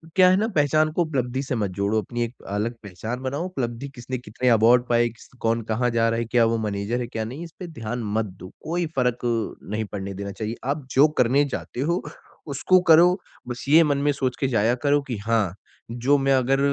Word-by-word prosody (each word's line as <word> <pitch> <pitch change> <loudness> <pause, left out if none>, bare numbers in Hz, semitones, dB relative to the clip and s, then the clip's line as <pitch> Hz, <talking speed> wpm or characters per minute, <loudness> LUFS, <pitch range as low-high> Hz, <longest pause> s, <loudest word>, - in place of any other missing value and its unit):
क्या 185 -1 +7
है 185 - +5
ना 220 +2 +1
पहचान 155 +1 +3
को 175 - +1
उपलब्धि 130 -5 -1
से 130 - -2
मत 105 -4 -1
जोड़ो, 100 +3 +1
अपनी 120 +4 -3
एक 115 - -4
अलग 105 +4 -2
पहचान 105 +5 -5
बनाओ। 140 +6 -3
उपलब्धि 135 -6 -4
किसने 130 +1 -5
कितने 125 +1 -2
अवार्ड 115 +2 +5
पाए, 120 0 +3
किस 115 - -16
कौन 115 +1 +1
कहाँ 120 +3 +1
जा 115 0 +2
रहा 115 - 0
है, 115 - -1
क्या 115 0 +3
वो 115 - +1
मैनेजर 105 +4 -2
है 120 - -3
क्या 110 -2 -4
नहीं, 130 +9 -7
इस 170 - -9
पे 180 - -6
ध्यान 120 -6 -5
मत 110 - +1 0.2
दो 90 - -9
कोई 170 +2 -1
फ़र्क 125 -2 0
अ, 115 -2 -2
नहीं 110 0 -1
पड़ने 100 -1 -5
देना 100 +1 -5
चाहिए। 110 +3 -4
आप 140 0 -2
जो 140 +3 +6
करने 130 +4 +4
जाते - - -7
हो, 170 +5 0 0.5
उसको 150 +6 +3
करो। 175 +3 +7 0.3
बस 120 0 -6
ये 160 +3 +7
मन 145 -3 +1
में 145 +1 +2
सोच 130 -3 -2
के 135 - +1
जाया 115 -1 +2
करो 145 0 +4
कि 120 - -2
हाँ, 110 -5 +1 0.4
जो 125 +5 +2
मैं 135 0 +2
अगर 135 +1 +2
125 Hz, 225 wpm, -24 LUFS, 115-140 Hz, 0.5 s, क्या